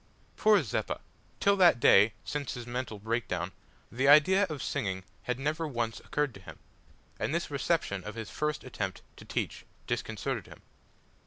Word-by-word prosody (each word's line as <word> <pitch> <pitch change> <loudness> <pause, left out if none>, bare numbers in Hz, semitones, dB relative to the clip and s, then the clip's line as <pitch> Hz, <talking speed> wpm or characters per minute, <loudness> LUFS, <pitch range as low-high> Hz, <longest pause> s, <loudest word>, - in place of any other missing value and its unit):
Poor 210 -5 +5
Zeppa! 110 - -2 0.4
till 200 0 +4
that 175 -10 +6
day, 105 -1 +6
since 145 -3 -3
his 120 -1 -6
mental 120 -2 -4
break 115 +3 -2
down, 90 0 -2 0.4
the 130 +4 +1
idea 170 +8 +7
of 150 -3 -4
singing 95 -9 -2 0.2
had 125 -1 -1
never 155 +4 -1
once 120 -5 -2
occurred 150 -4 -1
to 100 - -11
him, - - -11 0.6
and - - -1
this - - -2
reception 100 -2 0
of 105 +3 -7
his 115 -2 -6
first 150 0 -2
attempt 100 -8 -4
to - - -13
teach - - -3 0.2
disconcerted - - -3
him. - - -14
125 Hz, 165 wpm, -30 LUFS, 105-150 Hz, 0.6 s, idea